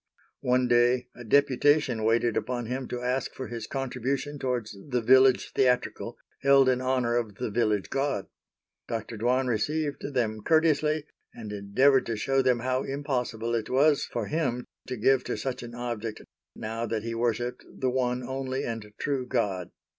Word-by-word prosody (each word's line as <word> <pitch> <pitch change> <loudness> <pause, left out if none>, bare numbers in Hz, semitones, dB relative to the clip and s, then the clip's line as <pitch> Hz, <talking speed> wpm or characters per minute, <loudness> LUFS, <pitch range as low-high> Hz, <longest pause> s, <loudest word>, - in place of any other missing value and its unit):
One 125 0 +2
day 120 +1 +3
a 120 - -9
deputation 140 -1 +3
waited 115 +1 +2
upon 125 -1 -2
him 130 +2 -3
to 125 0 -5
ask 125 +1 -1
for 130 - -6
his 115 -2 -5
contribution 135 +2 -3
towards 125 -5 -2
the 125 -2 +1
village 130 +2 +5
theatrical 125 -1 +1 0.2
held 140 -1 +6
in 125 0 +1
honor 130 -2 +1
of 110 -4 -2
the 115 0 -3
village 105 -3 0
god. 135 -7 0 0.6
Dr. 115 0 -4
Dwan 125 +4 +1
received 145 +4 -1
them 110 -3 0
courteously, 155 +1 +2 0.3
and 110 -3 -7
endeavored 130 +7 +3
to 115 - -1
show 135 +5 +2
them 125 -2 +2
how 130 +1 0
impossible 125 -5 -2
it 115 -2 -1
was 140 +2 +4
for 115 -3 -3
him 130 -3 -1 0.2
to 125 - -4
give 135 +4 +3
to - - -2
such 130 -2 -3
an 120 0 -8
object 115 -3 -4 0.3
now 115 +2 -4
that 110 -1 -2
he 115 0 -3
worshipped 120 +1 -1
the 130 -1 -1
One 125 -1 0
Only 130 +1 -3
and 115 -2 -5
True 135 -3 -2
God. 100 -8 -1
125 Hz, 165 wpm, -27 LUFS, 115-135 Hz, 0.6 s, held